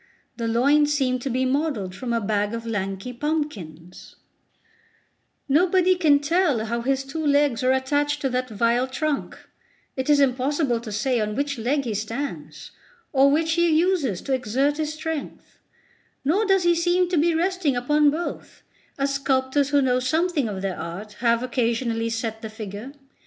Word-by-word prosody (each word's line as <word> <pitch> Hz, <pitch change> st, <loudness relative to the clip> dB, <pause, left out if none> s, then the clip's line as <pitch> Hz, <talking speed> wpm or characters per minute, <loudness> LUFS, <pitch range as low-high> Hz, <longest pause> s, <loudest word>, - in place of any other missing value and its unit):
The 230 Hz, -1 st, -3 dB
loins 285 Hz, +6 st, +3 dB
seem 260 Hz, -3 st, +1 dB
to 270 Hz, -, -4 dB
be 255 Hz, +1 st, 0 dB
modelled 260 Hz, -9 st, -1 dB
from 240 Hz, +5 st, -5 dB
a 230 Hz, -, +1 dB
bag 210 Hz, 0 st, -1 dB
of 230 Hz, 0 st, -6 dB
lanky 195 Hz, +1 st, -3 dB
pumpkins; 235 Hz, -, -5 dB, 1.3 s
nobody 365 Hz, +5 st, +3 dB
can 320 Hz, -6 st, +4 dB
tell 290 Hz, -6 st, +1 dB
how 235 Hz, +1 st, -2 dB
his 270 Hz, +2 st, 0 dB
two 315 Hz, +4 st, -5 dB
legs 285 Hz, -4 st, +2 dB
are 255 Hz, -, +3 dB
attached 290 Hz, +3 st, 0 dB
to 270 Hz, -, 0 dB
that 255 Hz, 0 st, -2 dB
vile 235 Hz, +4 st, +1 dB
trunk; 290 Hz, +2 st, -3 dB, 0.6 s
it 260 Hz, +2 st, -3 dB
is 295 Hz, -1 st, +5 dB
impossible 270 Hz, -1 st, +1 dB
to 230 Hz, -2 st, -8 dB
say 240 Hz, +4 st, 0 dB
on 210 Hz, 0 st, -2 dB
which 280 Hz, -2 st, -2 dB
leg 275 Hz, +5 st, 0 dB
he 235 Hz, -4 st, -3 dB
stands, 225 Hz, +7 st, -5 dB, 0.4 s
or 275 Hz, 0 st, +5 dB
which 320 Hz, +3 st, +1 dB
he 340 Hz, +1 st, +3 dB
uses 315 Hz, -, +1 dB
to 270 Hz, -, -2 dB
exert 260 Hz, +4 st, 0 dB
his 305 Hz, -1 st, -2 dB
strength; 315 Hz, -1 st, -6 dB, 0.7 s
nor 380 Hz, +10 st, +2 dB
does 385 Hz, -2 st, +3 dB
he 345 Hz, 0 st, +4 dB
seem 350 Hz, +2 st, +2 dB
to 360 Hz, -, 0 dB
be 330 Hz, +2 st, +3 dB
resting 350 Hz, -4 st, 0 dB
upon 295 Hz, +4 st, +3 dB
both, 325 Hz, +4 st, -5 dB, 0.3 s
as 275 Hz, 0 st, 0 dB
sculptors 275 Hz, 0 st, +1 dB
who 285 Hz, -1 st, +3 dB
know 250 Hz, -1 st, +2 dB
something 315 Hz, 0 st, 0 dB
of 195 Hz, -2 st, -5 dB
their 190 Hz, -2 st, -3 dB
art 175 Hz, +6 st, -7 dB
have 235 Hz, 0 st, +2 dB
occasionally 230 Hz, -2 st, -1 dB
set 225 Hz, -1 st, -3 dB
the 220 Hz, -, -6 dB
figure. 215 Hz, +3 st, -8 dB
265 Hz, 170 wpm, -24 LUFS, 230-300 Hz, 1.3 s, is